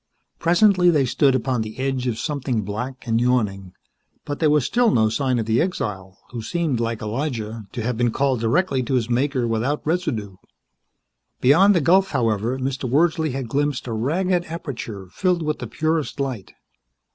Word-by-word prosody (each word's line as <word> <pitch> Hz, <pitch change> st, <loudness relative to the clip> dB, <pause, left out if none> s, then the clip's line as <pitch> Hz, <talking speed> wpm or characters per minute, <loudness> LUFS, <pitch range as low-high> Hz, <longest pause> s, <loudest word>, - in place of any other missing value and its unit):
Presently 180 Hz, +1 st, +4 dB
they 150 Hz, -5 st, +3 dB
stood 130 Hz, +2 st, +2 dB
upon 130 Hz, -1 st, 0 dB
the 110 Hz, +1 st, -6 dB
edge 130 Hz, -1 st, -1 dB
of 115 Hz, -3 st, -1 dB
something 130 Hz, -6 st, -2 dB
black 125 Hz, +6 st, -5 dB
and 115 Hz, 0 st, +1 dB
yawning, 105 Hz, -7 st, 0 dB, 0.5 s
but 145 Hz, -1 st, -4 dB
there 155 Hz, -, +3 dB
was 150 Hz, -4 st, +3 dB
still 240 Hz, -1 st, +3 dB
no 110 Hz, -, +3 dB
sign 130 Hz, +2 st, 0 dB
of 115 Hz, -, -1 dB
the 110 Hz, +1 st, +2 dB
exile, 95 Hz, -, -3 dB
who 120 Hz, -2 st, -5 dB
seemed, 155 Hz, +1 st, -1 dB
like 115 Hz, -1 st, -2 dB
Elijah, 110 Hz, -3 st, -4 dB
to 120 Hz, -3 st, -4 dB
have 120 Hz, 0 st, -2 dB
been 120 Hz, 0 st, +2 dB
called 135 Hz, +1 st, 0 dB
directly 130 Hz, +4 st, +1 dB
to 130 Hz, +2 st, -1 dB
his 120 Hz, -1 st, 0 dB
Maker 130 Hz, 0 st, +1 dB
without 115 Hz, +6 st, -1 dB
residue. 115 Hz, -, -2 dB, 1.0 s
Beyond 185 Hz, +10 st, +5 dB
the 170 Hz, -, +3 dB
gulf, 190 Hz, +6 st, +4 dB
however, 115 Hz, -1 st, 0 dB
Mr. 130 Hz, -1 st, -3 dB
Wordsley 160 Hz, +1 st, +2 dB
had 135 Hz, -2 st, -4 dB
glimpsed 145 Hz, +2 st, -1 dB
a 120 Hz, -, -4 dB
ragged 175 Hz, +10 st, 0 dB
aperture 125 Hz, -, -6 dB
filled 180 Hz, -3 st, 0 dB
with 150 Hz, 0 st, -2 dB
the -, -, -5 dB
purest 155 Hz, -3 st, -1 dB
light. 130 Hz, -8 st, -4 dB
130 Hz, 175 wpm, -22 LUFS, 115-155 Hz, 1.0 s, Beyond